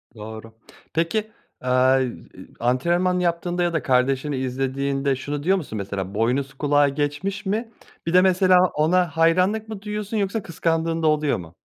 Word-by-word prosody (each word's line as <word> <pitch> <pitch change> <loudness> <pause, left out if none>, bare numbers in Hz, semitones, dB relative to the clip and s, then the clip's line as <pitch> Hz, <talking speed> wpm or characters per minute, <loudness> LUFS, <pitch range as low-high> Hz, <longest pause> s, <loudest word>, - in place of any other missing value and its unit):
Doğru. 110 +1 -9 0.4
Peki, 210 +7 -1 0.3
aaa, 130 +1 +3
iii, 125 -2 -3 0.4
antrenman 170 +9 +1
yaptığında 175 0 0
ya 175 -1 0
da 160 - -1
kardeşini 135 +2 +1
izlediğinde 135 +1 -1
şunu 145 +2 -5
diyor 190 +4 +3
musun 140 -10 -6
mesela, 100 -1 -4
"Boynuz 125 +6 0
kulağı 145 +1 +2
geçmiş." 150 +9 -3
mi? 225 +4 -2 0.3
Bir 165 - -2
de 180 - +7
mesela 185 0 +4 0.2
ona 175 +4 +2
hayranlık 185 +7 +3
mı 215 -3 -6
duyuyorsun 210 +1 -4
yoksa 200 +1 -1
kıskandığın 165 -1 -1
da 155 - +3
oluyor 150 -1 +2
mu? 85 -1 -11
155 Hz, 155 wpm, -23 LUFS, 130-180 Hz, 0.4 s, de